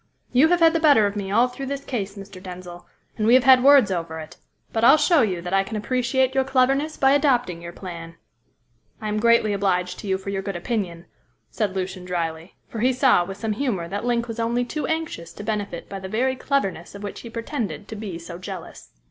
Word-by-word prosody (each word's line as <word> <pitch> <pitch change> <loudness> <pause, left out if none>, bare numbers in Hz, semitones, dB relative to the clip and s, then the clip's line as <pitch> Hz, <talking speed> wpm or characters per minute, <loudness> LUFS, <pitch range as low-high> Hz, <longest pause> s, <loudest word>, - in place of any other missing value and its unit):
You 255 +5 +5
have 350 +1 +2
had 330 0 +6
the 330 - +1
better 290 -9 +5
of 200 0 -2
me 200 -2 -4
all 230 +5 +4
through 265 +2 -7
this 280 +1 -4
case, 205 -5 -4
Mr. 195 -2 -10
Denzil, 180 -1 -9 0.3
and 215 - +1
we 240 - +7
have 260 - +5
had 260 -1 +7
words 275 -7 +6
over 165 -3 -3
it; 160 +2 -10 0.4
but 225 - 0
I'll 270 +6 +8
show 330 -1 +4
you 185 -6 -1
that 180 +1 -4
I 195 0 +4
can 220 +3 -7
appreciate 255 +3 0
your 265 - +2
cleverness 270 +3 +1
by 270 0 +4
adopting 250 - +2
your 170 0 -7
plan." 170 -2 -9 0.8
"I 215 - -4
am 210 0 -1
greatly 235 -2 +4
obliged 180 -2 0
to - - -7
you 190 -1 +1
for 195 +1 -6
your 195 -1 -2
good 195 -1 -5
opinion," 175 -3 -3 0.5
said 205 -4 -2
Lucian 185 -1 -4
drily, 170 -1 -4
for 225 - -7
he 255 +4 +3
saw 255 -8 +4
with 195 +2 -7
some 215 +1 -2
humour 210 -8 -2
that 205 +1 -4
Link 240 -1 0
was 230 0 -6
only 235 +2 0
too 305 +4 -3
anxious 320 - -3
to - - -9
benefit 205 -5 -3
by 195 - -6
the 190 0 -7
very 255 +5 0
cleverness 200 - -2
of 200 - -9
which 205 - -6
he 235 - -9
pretended 230 - -4
to 220 - -7
be 205 -5 -6
so 170 +1 -9
jealous. 185 -2 -9
210 Hz, 230 wpm, -23 LUFS, 185-255 Hz, 0.8 s, I'll